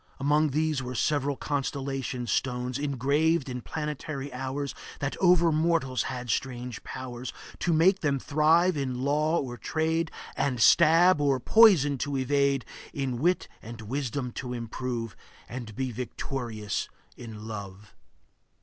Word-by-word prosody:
Among 150 +2 +3
these 155 0 0
were 125 0 -5
Several 145 +3 +1
constellation 135 -3 -3
stones, 125 +1 -1
Engraved 145 +3 +1
in 125 -1 -4
planetary 150 -1 -5
hours, 135 +2 -3 0.3
That 140 0 -2
over 175 -2 +5
mortals 155 -5 +1
had 125 -2 -4
strange 125 -1 -3
powers, 125 -1 -6 0.3
To 175 - 0
make 180 +5 +4
them 145 -4 +1
thrive 160 +6 +3
in 130 -3 -2
law 150 +4 +2
or 125 -3 -5
trade, 160 +6 -1 0.3
And 130 -4 0
stab 170 +5 +6
or 140 -2 +2
poison 155 - +5
to 140 +1 -2
evade, 140 0 +1 0.3
In 130 -4 -2
wit 180 +6 +1
and 115 +1 -9
wisdom 125 +2 -3
to 125 -2 -5
improve, 115 -1 -4 0.3
And 120 -4 -7
be 130 -1 -2
victorious 115 -3 -4 0.3
in 110 -2 -9
love. 100 -1 -8
135 Hz, 130 wpm, -28 LUFS, 125-150 Hz, 0.3 s, stab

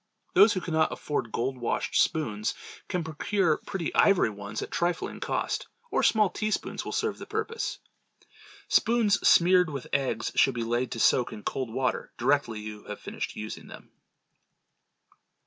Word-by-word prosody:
Those 200 +4 +7
who 185 - -2
cannot 160 -2 +1
afford 130 -6 -3
gold 130 +3 -2
washed 120 - -2
spoons, 110 -10 +1 0.3
can 180 -2 -2
procure 160 +2 0
pretty 190 -6 -4
ivory 195 - +4
ones 100 +1 -6
at - - -7
a - - -31
trifling 175 0 -1
cost, - - -2 0.2
or - - +2
small 215 -2 +4
teaspoons 215 +3 -2
will - - -5
serve - - -1
the - - -8
purpose. 445 +2 -3 0.9
Spoons 230 -3 +3
smeared 180 0 +6
with 140 -4 -5
eggs 135 -4 0
should 135 - +3
be 120 - -1
laid 120 +2 -1
to 115 - -5
soak 125 +2 +3
in 105 - -9
cold 130 -4 -3
water 130 +2 -1
directly 120 -3 +1
you 105 -1 -8
have - - -7
finished - - -5
using 110 0 -7
them. - - -13
145 Hz, 160 wpm, -28 LUFS, 115-185 Hz, 0.9 s, Those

